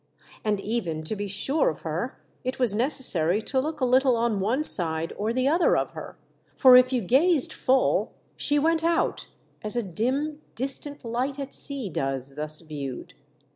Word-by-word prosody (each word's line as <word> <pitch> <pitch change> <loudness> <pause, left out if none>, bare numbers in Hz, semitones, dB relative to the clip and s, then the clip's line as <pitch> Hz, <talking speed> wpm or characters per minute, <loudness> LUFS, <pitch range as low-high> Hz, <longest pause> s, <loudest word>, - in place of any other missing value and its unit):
And 210 -2 -1
even 190 -8 -4
to 155 - -4
be 205 0 -5
sure 275 - +1
of - - -9
her, - - -5 0.3
it 255 0 -4
was 245 -5 +2
necessary 210 - +4
to 265 - -2
look 305 +1 -6
a - - +2
little 255 0 +2
on 230 -3 -1
one 235 +10 -1
side 165 - +5
or 215 +2 -3
the 255 +2 -1
other 335 +5 +2
of - - -3
her; - - -11 0.4
for 255 -2 +6
if 255 0 +5
you 250 -2 -1
gazed 275 - +1
full 260 +1 0 0.2
she 290 - -1
went 320 +2 0
out, 335 0 -1 0.4
as 215 +2 0
a 240 - -1
dim 265 - -3
distant 275 +2 -2
light 250 +4 -3
at 275 -1 -7
sea 275 -6 +1
does, 135 -4 -4
thus 150 +2 -1
viewed. 145 -5 -8
245 Hz, 175 wpm, -24 LUFS, 195-275 Hz, 0.4 s, for